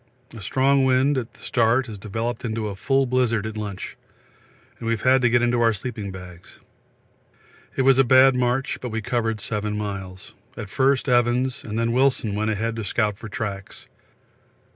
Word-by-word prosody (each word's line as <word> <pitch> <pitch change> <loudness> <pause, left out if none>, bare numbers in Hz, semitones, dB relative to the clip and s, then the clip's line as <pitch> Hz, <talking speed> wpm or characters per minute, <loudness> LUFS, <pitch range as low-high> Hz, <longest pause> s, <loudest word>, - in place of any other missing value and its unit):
A 115 - -9
strong 135 +6 +2
wind 130 +2 +3
at 125 -3 -4
the - - -18
start 120 +2 +2
has 110 -4 -9
developed 115 +4 -4
into 110 -2 -2
a 100 - -6
full 135 +5 +1
blizzard 120 -4 +1
at 110 0 -5
lunch, 105 -3 -6 0.8
and 115 - -5
we 115 - +2
have 110 - -4
had 130 0 +4
to 125 - +3
get 120 +1 +3
into 120 0 +2
our 115 -1 +4
sleeping 105 -1 -5
bags. 90 -2 -12 1.2
It 135 - +1
was 135 0 +5
a - - +7
bad 130 +1 +6
march, 125 +1 0
but 125 - -4
we 110 0 -4
covered 115 -2 -1
7 105 0 -3
miles. 95 -3 -6 0.2
At 100 - -7
first 135 0 +2
Evans, 125 +2 +1
and 110 -2 -5
then 115 0 +1
Wilson 130 -4 +2
went 110 +2 -1
ahead 110 +2 -1
to 110 - -3
scout 105 0 0
for 110 - -8
tracks. 100 -2 -6
115 Hz, 185 wpm, -23 LUFS, 105-130 Hz, 1.2 s, a